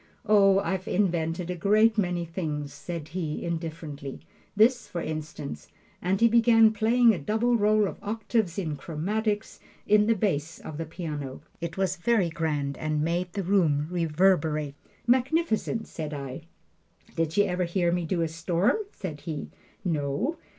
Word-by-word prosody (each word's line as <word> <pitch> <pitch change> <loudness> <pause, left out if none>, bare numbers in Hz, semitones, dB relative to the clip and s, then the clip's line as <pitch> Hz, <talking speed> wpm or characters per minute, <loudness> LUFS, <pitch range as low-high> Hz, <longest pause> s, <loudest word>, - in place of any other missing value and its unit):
"Oh, 195 -2 +5
I've 190 -1 -1
invented 175 -2 0
a - - -3
great 215 +5 +4
many 180 -4 0
things," 150 -4 -4
said 155 +1 -6
he, 160 -3 -3
indifferently 160 -4 -5 0.3
"this, 235 +4 +4
for 175 - -4
instance" 155 -3 -5 0.3
and 190 +2 +1
he 230 - +6
began 225 -1 +5
playing 230 +2 +4
a 180 - -3
double 220 +10 +1
roll 210 -1 +3
of - - -7
octaves 215 -3 -1
in 160 -7 -2
chromatics 205 +8 -2 0.3
in 210 0 +4
the 230 - +4
bass 170 -5 -1
of 155 0 -8
the 165 - -3
piano. 150 -5 -6 0.2
It 170 +1 -5
was 190 -1 0
very 200 -1 +2
grand 150 -4 -2
and 155 -1 -1
made 175 +2 -1
the 200 - -2
room 165 -6 +2
reverberate. 160 -3 +2 0.3
"Magnificent," 250 -3 +1
said 155 -2 -5
I. 140 +2 -6 0.7
"Did 165 +1 -1
you 205 - +6
ever 180 0 0
hear 175 0 +1
me 175 0 0
do 170 +1 0
a - - 0
storm?" 170 - +1
said 155 -6 -6
he. 155 -3 -5 0.3
"No." 160 - -1
175 Hz, 155 wpm, -27 LUFS, 155-210 Hz, 0.7 s, he